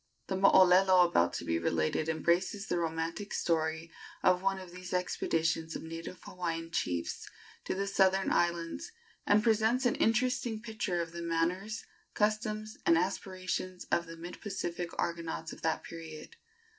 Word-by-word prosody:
The 190 Hz, -, 0 dB
mooolelo 185 Hz, -1 st, +6 dB
about 85 Hz, -, +3 dB
to -, -, -4 dB
be 85 Hz, 0 st, 0 dB
related 85 Hz, -, 0 dB
embraces 175 Hz, +6 st, +1 dB
the 175 Hz, -5 st, -1 dB
romantic 165 Hz, +4 st, -3 dB
story 160 Hz, 0 st, 0 dB, 0.3 s
of 180 Hz, 0 st, +4 dB
one 195 Hz, 0 st, +1 dB
of 185 Hz, -2 st, -9 dB
these 180 Hz, 0 st, -8 dB
expeditions 165 Hz, -2 st, 0 dB
of -, -, -5 dB
native 165 Hz, +2 st, -7 dB
Hawaiian 165 Hz, -2 st, -4 dB
chiefs 90 Hz, -, -2 dB, 0.4 s
to -, -, -1 dB
the 195 Hz, +1 st, -1 dB
southern 195 Hz, -1 st, +3 dB
islands, 170 Hz, -, 0 dB, 0.4 s
and 210 Hz, +1 st, +5 dB
presents 225 Hz, +3 st, +3 dB
an 245 Hz, -, +4 dB
interesting 240 Hz, 0 st, +1 dB
picture 215 Hz, -6 st, -2 dB
of 165 Hz, -, -9 dB
the 170 Hz, 0 st, -6 dB
manners, 175 Hz, +6 st, -1 dB, 0.3 s
customs 215 Hz, 0 st, -1 dB
and 165 Hz, -, +5 dB
aspirations 185 Hz, 0 st, -2 dB
of 170 Hz, -1 st, +2 dB
the 165 Hz, 0 st, -9 dB
mid 175 Hz, +2 st, -8 dB
Pacific 175 Hz, -4 st, -3 dB
Argonauts 165 Hz, -1 st, -3 dB
of -, -, -12 dB
that 160 Hz, -1 st, 0 dB
period. 160 Hz, -2 st, -9 dB
180 Hz, 150 wpm, -31 LUFS, 165-195 Hz, 0.4 s, mooolelo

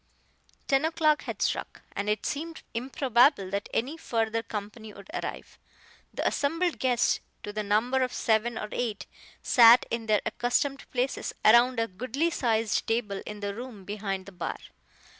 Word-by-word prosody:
Ten 270 Hz, +1 st, +3 dB
o'clock 315 Hz, -2 st, +2 dB
had -, -, -3 dB
struck, -, -, -2 dB
and 205 Hz, +1 st, -2 dB
it 210 Hz, 0 st, -1 dB
seemed 320 Hz, +3 st, -4 dB
improbable 245 Hz, -3 st, +2 dB
that 200 Hz, +1 st, -3 dB
any 270 Hz, +8 st, -1 dB
further 225 Hz, -5 st, -1 dB
company 215 Hz, 0 st, -7 dB
would 200 Hz, +10 st, -13 dB
arrive. 360 Hz, -, -6 dB, 0.5 s
The -, -, -1 dB
assembled 330 Hz, +4 st, 0 dB
guests, 250 Hz, -2 st, +2 dB, 0.2 s
to 205 Hz, -, -6 dB
the 215 Hz, -, -2 dB
number 220 Hz, +6 st, +1 dB
of 255 Hz, -1 st, 0 dB
seven 225 Hz, +1 st, +1 dB
or 210 Hz, -, -4 dB
eight, 225 Hz, -4 st, -3 dB, 0.4 s
sat 235 Hz, 0 st, +7 dB
in 230 Hz, -1 st, -3 dB
their 210 Hz, -2 st, +3 dB
accustomed 275 Hz, +3 st, -1 dB
places 255 Hz, +1 st, -2 dB
around 235 Hz, +2 st, +6 dB
a 230 Hz, -, +1 dB
goodly 255 Hz, -, -2 dB
sized 225 Hz, -6 st, 0 dB
table 220 Hz, -4 st, -1 dB
in 210 Hz, 0 st, -7 dB
the 200 Hz, 0 st, -2 dB
room 225 Hz, -3 st, -9 dB
behind 195 Hz, -2 st, -4 dB
the 200 Hz, -, -11 dB
bar. 180 Hz, -2 st, -4 dB
230 Hz, 160 wpm, -28 LUFS, 210-265 Hz, 0.5 s, sat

